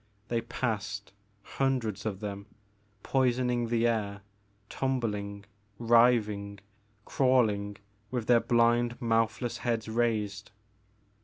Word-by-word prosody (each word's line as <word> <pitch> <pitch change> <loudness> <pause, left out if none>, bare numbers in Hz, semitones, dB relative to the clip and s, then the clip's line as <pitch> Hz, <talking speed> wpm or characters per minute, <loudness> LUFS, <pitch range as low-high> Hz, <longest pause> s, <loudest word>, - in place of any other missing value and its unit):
They 115 -1 0
passed, 105 -4 -3 0.3
hundreds 115 -7 -1
of 100 -2 -4
them, 100 -1 -5 0.6
poison 125 -1 +1
ing 120 -1 0
the 115 0 +1
air, 105 -4 -1 0.5
tumbling, 105 -7 -2 0.3
writhing, 115 -4 +3 0.5
crawling 110 -6 +2 0.3
with 120 -2 -3
their 120 0 +5
blind 120 0 +2
mouthless 115 0 0
heads 115 -2 -1
raised. 110 -3 -1
115 Hz, 95 wpm, -29 LUFS, 105-120 Hz, 0.6 s, their